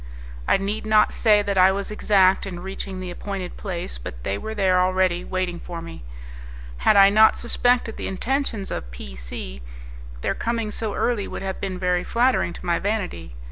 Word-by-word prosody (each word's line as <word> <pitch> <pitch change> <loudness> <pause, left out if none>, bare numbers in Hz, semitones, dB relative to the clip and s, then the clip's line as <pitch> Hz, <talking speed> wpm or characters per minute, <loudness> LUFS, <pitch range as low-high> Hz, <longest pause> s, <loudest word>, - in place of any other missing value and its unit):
I - - +4
need 200 +3 -3
not 215 0 +4
say 210 -3 +4
that 200 -2 0
I 185 +1 +7
was 200 +2 -3
exact 195 -2 +3
in 175 -2 -6
reaching 190 0 -6
the 185 -1 -5
appointed 190 0 -5
place, 175 - -5
but - - -8
they 95 - -1
were 220 - -5
there 190 -3 +3
already, 185 -1 +2
waiting 185 -2 -3
for 170 -1 -7
me. 165 - -9 0.7
Had 205 - +4
I 195 0 +8
not 220 +1 +6
suspected 245 -1 +1
the - - -4
intentions 225 -1 -2
of - - -5
P 65 +2 -9
C, 60 +1 -7 0.6
their - - 0
coming 230 -2 -2
so 215 -1 -3
early 230 -5 0
would - - -6
have 190 -1 -4
been 190 -2 -3
very 180 -1 0
flattering 245 -5 +2
to - - -10
my 170 -1 +1
vanity. 185 - -3
190 Hz, 185 wpm, -23 LUFS, 175-210 Hz, 0.7 s, I